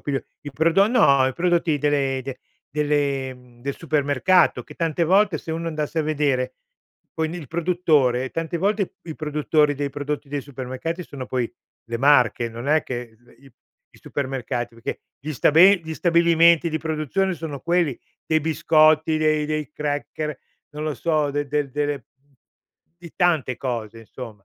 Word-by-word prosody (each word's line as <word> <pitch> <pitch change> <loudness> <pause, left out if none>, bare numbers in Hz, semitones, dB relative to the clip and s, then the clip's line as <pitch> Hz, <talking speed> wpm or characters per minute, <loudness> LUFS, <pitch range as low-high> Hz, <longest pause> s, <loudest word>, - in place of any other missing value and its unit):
piglio 140 -2 -3 0.2
i 145 - -7
prodo 165 +7 +3
no, 140 - +4
i 130 - -1
prodotti 170 -2 +1
delle 140 -2 +1
de 135 0 -7 0.4
delle 145 -3 0
mhmm, 125 -1 -20
del 140 +2 -4
supermercato 155 +3 +2
che - - -13
tante 165 0 0
volte 190 0 +3
se 160 - -6
uno 165 +1 -3
andasse 155 0 -2
a - - 0
vedere 145 -4 0 0.6
quindi 160 +2 -2
il 155 - -9
produttore: 155 -7 +1
tante 165 +1 -3
volte 200 +2 0
i 160 - -7
produttori 150 -1 +1
dei 140 0 -3
prodotti 145 +1 -4
dei 145 0 -3
supermercati 140 +6 -5
sono 135 -5 -8
poi 125 -2 -2 0.3
le 115 0 -4
marche, 125 -3 +4
non 115 +3 -8
è 155 0 +3
che 120 -3 -6
l 120 +1 -23
i 135 - -17 0.4
i - - -17
supermercati, 130 -3 -3
perché 115 0 -6 0.2
gli 150 - -6
sta 145 - +2
be 185 +5 +7
gli 160 0 -6
stabilimenti 170 0 +4
di 160 -1 -2
produzione 160 +5 -1
sono 150 -4 -6
quelli 170 -4 +1 0.3
dei 160 0 +2
biscotti, 155 0 +3
dei 155 -1 +1
dei 155 -2 -3
cracker, 150 0 -3 0.3
non 150 +1 -7
lo 155 -1 -2
so, 155 0 0
de 145 +1 -2
de 145 0 -1
delle 145 +1 -1 0.2
mhmm, 140 +2 -37 0.7
di 170 -2 -12
tante 160 -9 +1
cose, 115 -4 -4
insomma. 115 -3 -10
150 Hz, 165 wpm, -23 LUFS, 135-165 Hz, 0.7 s, be